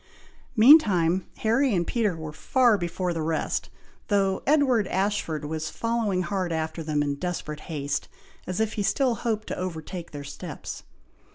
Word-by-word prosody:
Meantime, 200 - +6
Harry 230 +2 +2
and 175 -1 +1
Peter 210 -6 0
were 155 -1 -6
far 245 - +3
before 175 -1 -2
the 165 - -3
rest, 160 0 -1 0.4
though 195 -2 +1
Edward 265 -8 +3
Ashford 190 -6 -1
was 155 +1 -3
following 225 -5 -1
hard 185 -2 -2
after 160 0 -2
them 150 -2 0
in 145 -1 -1
desperate 155 -1 -4
haste, 145 -3 -2 0.4
as 185 +1 -3
if 220 -1 0
he 215 - -2
still 245 +5 +2
hoped 220 -1 -2
to - - -2
overtake 175 -1 -5
their 145 -1 -7
steps. 145 +2 -7
185 Hz, 155 wpm, -26 LUFS, 160-220 Hz, 0.4 s, Meantime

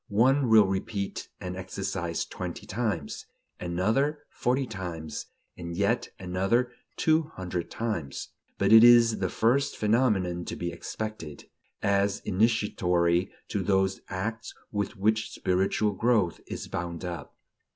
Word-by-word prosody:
One 125 +5 +3
will 110 -2 +7
repeat 95 +1 -3
an 90 0 -5
exercise 95 -2 -3
twenty - - -6
times, 100 -9 -3 0.3
another 110 - 0
forty 130 +2 0
times, 90 -8 -6 0.3
and 85 -1 -6
yet 100 +5 +1
another 95 +7 0 0.3
two 155 -1 +2
hundred 90 -2 -4
times; 105 -12 -3 0.3
but - - +2
this 110 0 +10
is 120 -2 +7
the 95 -2 0
first 130 +9 +1
phenomenon 105 -6 +2
to - - -4
be 85 0 -3
expected, 85 -3 -6 0.4
as 100 0 +2
initiatory 95 -4 +2 0.2
to 105 - -1
those 95 0 +1
acts 110 +4 -4 0.2
with 100 -1 -2
which 110 +2 +1
spiritual 95 +3 +1
growth 105 -3 +1
is - - -5
bound 85 0 -4
up. 85 -4 -6
100 Hz, 125 wpm, -28 LUFS, 90-115 Hz, 0.4 s, this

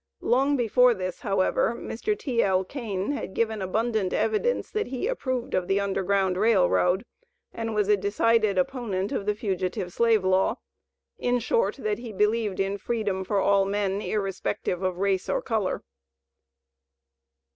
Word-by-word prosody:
Long 275 +3 +2
before 245 +1 +4
this, 185 -1 -4
however, 200 +2 +1
Mr. 415 - -3
T.L. 200 -8 +1
Kane 205 -3 -3
had 285 -9 -5
given 220 -2 0
abundant 215 0 0
evidence 220 - 0
that 430 0 -1
he 255 +5 -3
approved 260 - -2
of 180 -1 0
the 195 +1 +2
Underground 195 -1 0
Rail 205 -3 +4
Road, 180 +5 +2 0.5
and 225 -1 -4
was 210 -2 +1
a 210 - +5
decided 205 +1 +2
opponent 200 -1 -1
of 200 - -3
the 210 - +1
Fugitive 185 -3 -3
Slave 225 -4 +3
Law; 185 0 +2 0.6
in 245 0 +1
short, 470 - +1
that 430 -1 -2
he 240 -2 -7
believed 210 0 0
in 195 +1 -1
freedom 205 -4 -2
for 200 +1 0
all 200 0 +3
men, 200 0 -1
irrespective 195 -3 -2
of 185 -2 -1
race 195 -1 0
or - - +1
color. 215 -5 -2
205 Hz, 150 wpm, -26 LUFS, 190-230 Hz, 0.6 s, a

